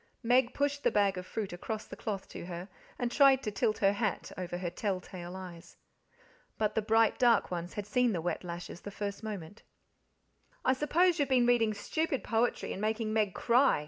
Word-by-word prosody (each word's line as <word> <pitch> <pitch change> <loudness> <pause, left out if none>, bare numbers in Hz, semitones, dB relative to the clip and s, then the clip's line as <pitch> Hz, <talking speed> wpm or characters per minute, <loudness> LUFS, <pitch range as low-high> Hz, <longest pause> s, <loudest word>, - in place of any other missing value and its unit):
Meg 245 +1 +4
pushed 285 0 0
the - - +4
bag 200 -2 +2
of 180 0 -6
fruit 210 -5 -4
across 215 +5 -4
the - - -9
cloth 200 -3 -4
to - - -8
her, 175 +1 -6 0.3
and 245 -1 -1
tried 270 0 +5
to 210 - -2
tilt 210 +2 0
her 195 0 +3
hat 205 -1 -2
over 180 -1 -4
her 175 -1 -3
tell 190 0 -1
tale 180 -1 -8
eyes. 180 -2 -10 0.8
But 215 -1 +1
the 220 - +1
bright 225 +1 +3
dark 240 -6 +4
ones 175 0 -4
had 205 - -3
seen 245 +3 +2
the 180 - -1
wet 175 +3 -2
lashes 175 0 -7
the - - -7
first 200 0 -5
moment. 205 -4 -7 1.0
"I 260 - +5
s'pose 335 +5 +2
you've 285 -2 +1
been 250 -2 +4
reading 230 -3 +3
stupid 290 +6 -1
poetry 230 +1 0
and 195 - -6
making 215 0 -1
Meg 210 -4 +1
cry?" 250 - +4
215 Hz, 200 wpm, -31 LUFS, 185-245 Hz, 1.0 s, tried